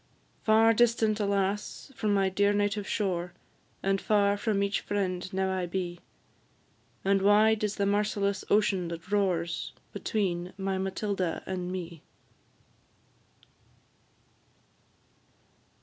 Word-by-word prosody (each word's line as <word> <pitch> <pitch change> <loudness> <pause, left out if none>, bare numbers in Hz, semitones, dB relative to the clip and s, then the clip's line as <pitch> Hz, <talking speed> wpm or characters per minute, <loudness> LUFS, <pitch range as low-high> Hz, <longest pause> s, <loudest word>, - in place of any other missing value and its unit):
Far 225 +1 +5
distant, 225 -2 +2
alas! 200 +5 -1
from 215 -2 0
my 195 -1 +3
dear 200 +2 +2
native 205 0 0
shore, 180 -4 -1 0.5
And 195 0 +1
far 205 -1 +3
from 205 -1 0
each 200 0 0
friend 185 -3 -2
now 190 0 0
I 185 -1 -2
be; 175 -1 -3 1.1
And 195 0 +3
wide 215 +2 +4
is 210 -1 0
the 200 - 0
merciless 200 -1 0
ocean 200 -4 +2
that 170 +3 -8
roars 175 -5 0 0.2
Between 180 -4 -2
my 195 -1 -2
Matilda 190 -2 -2
and 180 -1 -4
me. 170 -4 -6
200 Hz, 110 wpm, -29 LUFS, 185-205 Hz, 1.1 s, Far